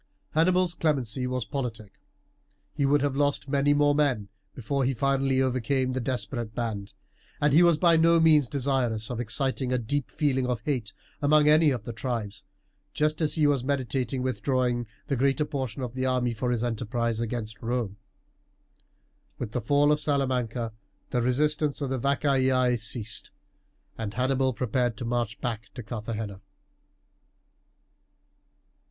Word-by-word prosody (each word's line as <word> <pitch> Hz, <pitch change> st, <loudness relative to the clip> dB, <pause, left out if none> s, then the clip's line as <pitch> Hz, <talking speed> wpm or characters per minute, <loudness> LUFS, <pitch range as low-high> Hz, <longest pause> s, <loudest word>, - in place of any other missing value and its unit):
Hannibal's 180 Hz, +2 st, +3 dB
clemency 130 Hz, -7 st, 0 dB
was 125 Hz, -3 st, -2 dB
politic. 115 Hz, -7 st, -5 dB, 0.7 s
He 140 Hz, -, +1 dB
would 145 Hz, 0 st, +3 dB
have 140 Hz, -2 st, 0 dB
lost 145 Hz, 0 st, +1 dB
many 140 Hz, +1 st, +2 dB
more 145 Hz, 0 st, +4 dB
men 135 Hz, -9 st, +1 dB, 0.3 s
before 135 Hz, +3 st, -1 dB
he 130 Hz, +1 st, +1 dB
finally 135 Hz, +1 st, +2 dB
overcame 130 Hz, +1 st, 0 dB
the 130 Hz, -, -2 dB
desperate 120 Hz, -2 st, -3 dB
band, 105 Hz, -4 st, -3 dB, 0.5 s
and 145 Hz, -1 st, +2 dB
he 160 Hz, -, +7 dB
was 170 Hz, -3 st, +5 dB
by 170 Hz, 0 st, +5 dB
no 165 Hz, +1 st, +5 dB
means 155 Hz, -4 st, +5 dB
desirous 125 Hz, -5 st, -1 dB
of 120 Hz, -, -4 dB
exciting 130 Hz, +2 st, -1 dB
a 125 Hz, -, +2 dB
deep 125 Hz, +3 st, -2 dB
feeling 135 Hz, -4 st, 0 dB
of 125 Hz, -3 st, -1 dB
hate 125 Hz, -6 st, -2 dB, 0.3 s
among 150 Hz, +1 st, +4 dB
any 155 Hz, +1 st, +6 dB
of 125 Hz, -6 st, -2 dB
the 115 Hz, -, -6 dB
tribes, 110 Hz, -4 st, -4 dB, 0.5 s
just 155 Hz, +1 st, +1 dB
as 155 Hz, -, +1 dB
he 155 Hz, -2 st, +3 dB
was 140 Hz, -4 st, +2 dB
meditating 130 Hz, -1 st, -1 dB
withdrawing 125 Hz, -2 st, 0 dB, 0.2 s
the 140 Hz, -, -1 dB
greater 135 Hz, +4 st, +2 dB
portion 130 Hz, -3 st, -4 dB
of 120 Hz, -2 st, -4 dB
the 130 Hz, 0 st, -1 dB
army 125 Hz, -2 st, +1 dB
for 125 Hz, +2 st, -2 dB
his 120 Hz, -1 st, 0 dB
enterprise 115 Hz, 0 st, -1 dB
against 115 Hz, -1 st, -4 dB
Rome. 115 Hz, -4 st, -2 dB, 1.4 s
With 115 Hz, -4 st, -5 dB
the 125 Hz, -, -2 dB
fall 145 Hz, +5 st, +3 dB
of 150 Hz, -, +2 dB
Salamanca 125 Hz, -6 st, -1 dB, 0.4 s
the 125 Hz, -, +1 dB
resistance 150 Hz, +4 st, +1 dB
of 140 Hz, -3 st, -3 dB
the 130 Hz, -, -1 dB
Vacaei 130 Hz, -2 st, +2 dB
ceased, 110 Hz, -1 st, -4 dB, 0.7 s
and 105 Hz, -2 st, -4 dB
Hannibal 130 Hz, +1 st, +1 dB
prepared 125 Hz, -1 st, -1 dB
to 120 Hz, -, -5 dB
march 120 Hz, -1 st, -2 dB
back 115 Hz, -2 st, -3 dB
to 125 Hz, -, -6 dB
Carthagena. 105 Hz, -3 st, -5 dB
130 Hz, 150 wpm, -27 LUFS, 120-140 Hz, 1.4 s, he